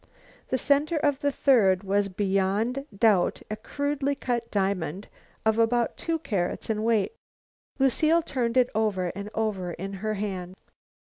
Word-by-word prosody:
The 260 - 0
center 290 +5 +2
of 290 -2 +1
the 285 0 +1
third 210 -10 +3
was 200 +1 +1
beyond 200 +7 0
doubt 210 -4 +3
a - - -1
crudely 285 +5 -2
cut 240 -3 -2
diamond 190 -2 -1 0.4
of 220 +1 +3
about 235 +1 +2
two 330 -1 -1
carats 200 - -2
weight. 220 - +1 0.6
Lucile 310 +5 +3
turned 245 -5 -1
it 250 -1 +4
over 205 -5 0
and 200 +1 -6
over 195 -5 -1
in 195 +3 -6
her 215 0 -1
palm. 185 -3 -4
220 Hz, 140 wpm, -26 LUFS, 195-270 Hz, 0.6 s, it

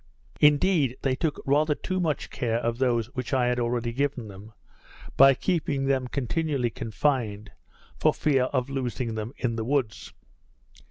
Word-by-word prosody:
Indeed, 150 -3 +3
they 135 - +2
took 155 +1 -2
rather 150 +2 +2
too 185 +4 -3
much 160 -5 -2
care 120 -4 -1
of 115 0 -2
those 120 -3 0
which 130 +1 -2
I 125 -2 +2
had 125 0 +1
already 120 0 -1
given 135 -4 -2
them, 100 +3 -12 0.6
by 135 0 +7
keeping 150 -4 -1
them 135 -2 +1
continually 140 -1 -1
confined, 110 -3 -2 0.5
for - - +4
fear 135 -4 +1
of 130 -1 -1
losing 125 -3 -3
them 110 +1 -4
in 115 -3 -2
the 110 - -2
woods. 125 -3 -2
130 Hz, 155 wpm, -26 LUFS, 115-145 Hz, 0.6 s, by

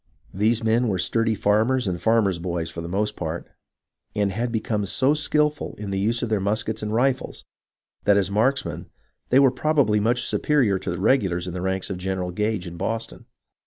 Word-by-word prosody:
These 110 +4 +1
men 115 +2 +2
were 95 -4 0
sturdy 115 +5 +1
farmers 110 +6 +2
and 90 -3 -2
farmers' 110 -6 +2
boys 85 -1 -3
for 85 - -6
the 85 - -6
most 105 +4 -1
part, 80 0 -4 0.7
and 100 -1 +1
had 115 +4 -2
become 110 -2 -1
so 135 +8 +2
skilful 150 0 0
in 100 -1 -5
the 95 - -1
use 115 +4 0
of 120 - -2
their 110 -2 +1
muskets 110 +3 -1
and 105 0 -3
rifles, 125 +4 0 0.6
that 100 0 +5
as 100 -1 +1
marksmen 130 +7 0 0.4
they 130 - +4
were 135 -2 +6
probably 135 -6 +2
much 120 +3 +1
superior 125 -11 +2
to - - -5
the 90 - -3
regulars 95 -6 +2
in 90 - -5
the 90 - -4
ranks 95 +1 -2
of 90 - -4
Gen 95 +1 -2
eral 90 -1 -3
Gage 105 -1 -1
in 85 -1 -8
Boston. 115 +5 -4
105 Hz, 200 wpm, -24 LUFS, 95-120 Hz, 0.7 s, were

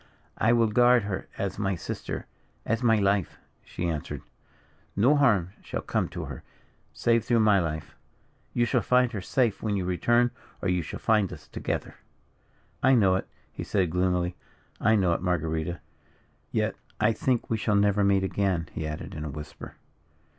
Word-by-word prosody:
"I 110 - +4
will 120 -1 +4
guard 120 +1 +5
her 100 -1 -4
as 100 +1 -3
my 95 -2 0
sister; 85 - -5 0.4
as 115 +1 0
my 115 -2 +4
life," 100 -2 +1 0.3
she 90 - -4
answered. 80 -3 -4 0.7
"No 125 +9 +4
harm 105 - +3
shall - - -5
come - - -1
to - - -5
her, - - -7 0.5
save 115 -1 +2
through 120 -2 +3
my 105 -2 +5
life. 80 -3 -4 0.6
You 120 - +2
shall 125 0 +1
find 125 +3 +3
her 105 -5 -4
safe 115 +1 0
when 105 -2 -1
you 95 - -2
return, 120 +7 +2 0.3
or 95 - -1
you 90 -1 +1
shall - - -6
find 105 -4 +2
us - - -10
together." - - -4 0.8
"I 130 +1 +5
know 100 -6 +4
it," 95 - -1 0.3
he - - -5
said, 95 -5 0
gloomily. 90 0 +1 0.4
"I 110 +1 +4
know 95 -5 +3
it, - - -2
Marguerita. 85 -1 -1 0.7
Yet, - - 0 0.2
I 110 +2 +3
think 125 +2 0
we 115 - +2
shall 105 0 +1
never 100 0 +3
meet 100 -1 +3
again," 95 -4 0
he 80 - -4
added, 75 0 -6
in 75 - -5
a 75 - -4
whisper. 75 +2 -9
100 Hz, 175 wpm, -27 LUFS, 90-115 Hz, 0.8 s, guard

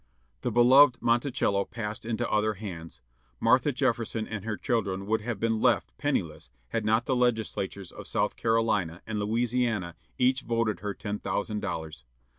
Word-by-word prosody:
The - - -1
beloved 125 +3 +6
Monticello 120 -4 +1
passed 110 +1 -6
into 115 0 -1
other 110 0 +1
hands. 85 - -8 0.4
Martha 125 +5 +4
Jefferson 120 -4 -1
and 110 -3 -5
her 110 -1 -3
children 100 -6 -1
would 110 +2 0
have 110 -2 -4
been 115 0 0
left 120 -7 +2
penniless - - -2 0.2
had 115 - -1
not 110 +2 +2
the 130 - +1
Legislatures 110 -6 -1
of - - -9
South - - 0
Carolina 110 -7 0
and 110 -1 -3
Louisiana 115 -3 0 0.2
each 130 +1 +2
voted 115 -3 -1
her 100 0 -4
ten 105 -1 -4
thousand 105 -1 -2
dollars. 80 -7 -5
110 Hz, 155 wpm, -28 LUFS, 105-120 Hz, 0.4 s, beloved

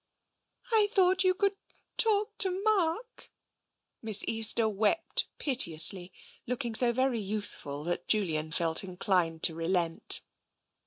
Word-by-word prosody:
" - - -51 0.3
I 435 -2 +3
thought 375 -3 +3
you 370 0 +2
could 395 0 -1 0.4
talk 425 0 +2
to 380 0 +1
Mark." 430 +3 -2 0.7
Miss 215 -2 +3
Easter 225 0 +2
wept 215 +10 -1
piteously, 185 - +2 0.4
looking 245 -1 -4
so 240 +2 +4
very 255 -1 -1
youthful 200 -8 -6
that 175 +1 -4
Julian 160 -7 -1
felt 165 +1 +1
inclined 180 -3 -2
to 165 - +4
relent. 165 0 +1
220 Hz, 120 wpm, -28 LUFS, -, 0.7 s, so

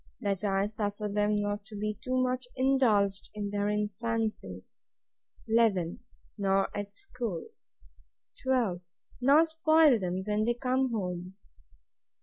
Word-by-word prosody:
That 200 -1 -2
I 195 -1 +1
suffer 210 0 -3
them 210 +1 +1
not 205 0 -2
to 215 -1 -10
be 210 0 -3
too 255 0 0
much 255 0 -1
indulged 230 -7 +2
in 205 -1 -3
their 205 0 0
infancy. 210 - -2 0.8
11. 220 -7 +2 0.4
Nor 195 -1 +1
at 205 0 -5
school. 235 -9 -5 0.9
12. 240 -9 +1 0.4
Nor 285 +6 +6
spoil 315 -5 +4
them 185 0 -2
when 210 +1 0
they 240 +1 +1
come 255 +1 +1
home. 180 -3 -4
210 Hz, 125 wpm, -30 LUFS, 200-245 Hz, 0.9 s, Nor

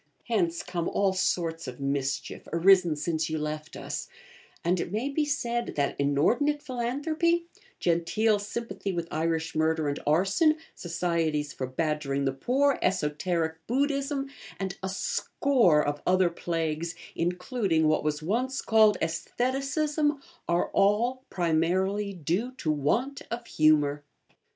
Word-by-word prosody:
Hence 175 -8 0
come 170 -2 -2
all 195 -1 +1
sorts 170 -3 -1
of 125 +1 -7
mischief, 140 0 -2
arisen 175 -1 +5
since 160 +2 -1
you 155 - -1
left 150 0 -4
us; - - -5 0.6
and, 180 +1 +2
it 170 - -3
may 225 +7 -1
be 300 +2 0
said, 240 -5 -2
that 140 -1 0
inordinate 235 - +2
philanthropy, 300 +7 0 0.3
genteel 195 +6 +2
sympathy 205 -1 -4
with 170 -2 -3
Irish 160 +1 -1
murder 160 -1 +1
and 145 0 -2
arson, 190 - +3 0.2
Societies 165 -4 -1
for 130 - -4
Badgering 140 0 -1
the 135 - +2
Poor, 270 - +1
Esoteric 160 -1 0
Buddhism, 275 +2 0 0.3
and 190 -2 -3
a 190 - -3
score 190 - +2
of 145 0 -2
other 185 -1 +4
plagues, 165 -1 -2 0.2
including 180 - 0
what 155 - +2
was 150 0 -1
once 250 - -1
called 215 -3 +5
Aestheticism, 275 - 0 0.3
are 170 0 +1
all, 240 +6 +2
primarily, 185 +4 +1
due 185 - -2
to 170 -11 -1
want 230 - 0
of 235 0 -4
humour. 150 -4 +3
180 Hz, 130 wpm, -28 LUFS, 155-240 Hz, 0.6 s, arisen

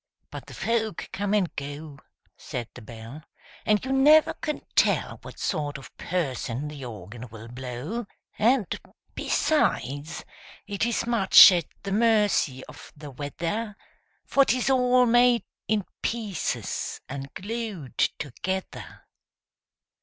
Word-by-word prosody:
But - - -8
the - - -10
folk 225 -2 -1
come 205 +1 0
and 190 -5 0
go, 145 +1 -7 0.4
Said 120 -3 -6
the 125 - -11
Bell, 115 +6 -10 0.5
And 210 +2 +3
you 265 - -2
never 305 +4 +6
can 300 -1 -4
tell - - +2
What - - -11
sort 150 -5 -2
of 135 - -13
person 140 -6 -2
the 145 -2 -8
Organ 115 +2 -8
will 110 +1 -10
blow! 130 - -5 0.3
And, 235 0 +4 0.5
besides, 155 - 0 0.4
it 205 +2 -1
is 235 - 0
much 230 -5 +9
at 175 -4 +1 0.2
the 200 - -4
mercy 210 - +2
of - - -13
the 145 -1 -9
weather 170 - -4 0.5
For 275 - +4
'tis 255 0 +1
all 250 -1 +4
made 240 0 +4 0.2
in 210 -3 +1 0.2
pieces 220 -6 -2
and 135 0 -6
glued 205 - -5 0.2
together! 185 +7 -5
190 Hz, 125 wpm, -26 LUFS, 140-230 Hz, 0.5 s, much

